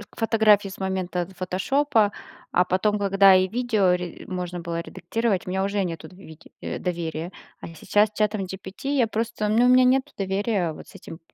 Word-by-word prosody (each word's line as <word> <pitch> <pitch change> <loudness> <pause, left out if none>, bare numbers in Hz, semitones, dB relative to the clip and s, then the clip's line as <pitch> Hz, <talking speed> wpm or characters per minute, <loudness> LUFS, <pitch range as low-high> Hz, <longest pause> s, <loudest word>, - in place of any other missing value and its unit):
фотографии 215 -3 +3
с 190 - -10
момента 185 -2 -2
"Фотошопа", 210 +4 +1 0.4
а 180 - +3
потом, 210 +4 +1
когда 195 -1 +5
и 185 0 +3
видео 220 -5 +1
ре 180 -1 -5
можно 180 -1 -4
было 170 0 -4
редактировать, 195 +3 -2
у - - -6
меня 190 +1 -1
уже 200 0 0
нету 165 -2 -5
дви 180 -4 -14 0.2
доверия. 170 -1 -4 0.3
А - - -8
сейчас 210 +5 +2
с - - -37
чатом 210 -2 0
GPT 190 +7 -7
я 240 -4 +3
просто 220 -1 -2
ну, 230 +3 +4
у - - +5
меня 255 0 +6
нету 265 +3 +2
доверия 195 -3 -1
вот - - -12
с - - -17
этим 165 - -10
195 Hz, 180 wpm, -24 LUFS, 180-220 Hz, 0.4 s, меня